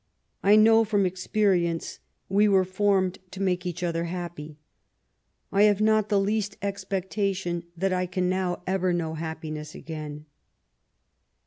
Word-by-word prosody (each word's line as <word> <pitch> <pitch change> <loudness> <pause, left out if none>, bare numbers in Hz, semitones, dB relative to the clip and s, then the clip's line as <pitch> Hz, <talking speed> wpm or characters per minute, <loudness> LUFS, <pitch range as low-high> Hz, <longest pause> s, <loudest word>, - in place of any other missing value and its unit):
I 205 +2 +5
know 225 +1 +6
from 205 -2 +1
experience 180 -2 0 0.3
we 205 +2 +3
were 195 -2 +4
formed 190 -1 +1
to 190 - -9
make 180 -2 0
each 175 +1 -4
other 170 -1 -1
happy. 170 -4 -6 0.9
I 200 - +3
have 205 -1 +1
not 215 -1 +3
the 205 -2 +3
least 205 0 -1
expectation 195 -2 -2
that 190 +2 0
I 180 0 0
can 180 0 -1
now 185 -1 -1
ever 185 -1 0
know 165 -2 -2
happiness 155 -1 -6
again." 150 -2 -7
185 Hz, 135 wpm, -26 LUFS, 170-200 Hz, 0.9 s, know